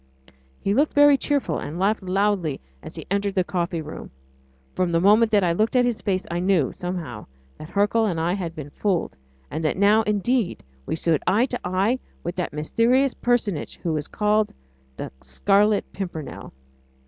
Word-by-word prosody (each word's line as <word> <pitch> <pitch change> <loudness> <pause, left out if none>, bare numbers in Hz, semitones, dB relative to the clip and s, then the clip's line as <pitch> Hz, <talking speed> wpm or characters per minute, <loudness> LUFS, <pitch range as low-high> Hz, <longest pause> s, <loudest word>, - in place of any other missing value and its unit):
He 200 - 0
looked 290 +7 +2
very 290 0 +7
cheerful, 285 0 -1
and 155 +4 -6
laughed 205 +4 +1
loudly 190 -4 0 0.2
as - - -10
he - - -7
entered 200 0 0
the 185 - +3
coffee 175 -2 -2
room. 155 - -8 0.6
From 180 -2 0
the 165 - +3
moment 210 +5 +5
that 205 -3 +3
I 170 -1 +2
looked 215 +7 0
at 250 -1 +5
his 240 -3 -1
face 190 -2 -1
I 170 - -1
knew, 180 -7 +2
somehow, 170 -12 -5 0.3
that 155 - -9
Hercule 210 +2 +2
and 170 -5 -1
I 170 +2 +1
had 175 -4 -4
been 145 -2 -8
fooled, 180 - -1 0.4
and 160 - -3
that 155 - 0
now, 205 +3 +5
indeed, 210 0 0 0.2
we - - -1
stood 160 -2 +1
eye 210 +7 +4
to 250 -2 -4
eye 195 +8 +1 0.2
with 175 +1 -4
that 180 - -2
mysterious 235 - +2
personage 225 -9 -1
who 165 -2 0
is 150 -1 -3
called 210 0 +1 0.5
the - - -5
Scarlet 200 - +2
Pimpernel. 175 -6 -6
195 Hz, 180 wpm, -24 LUFS, 170-215 Hz, 0.6 s, very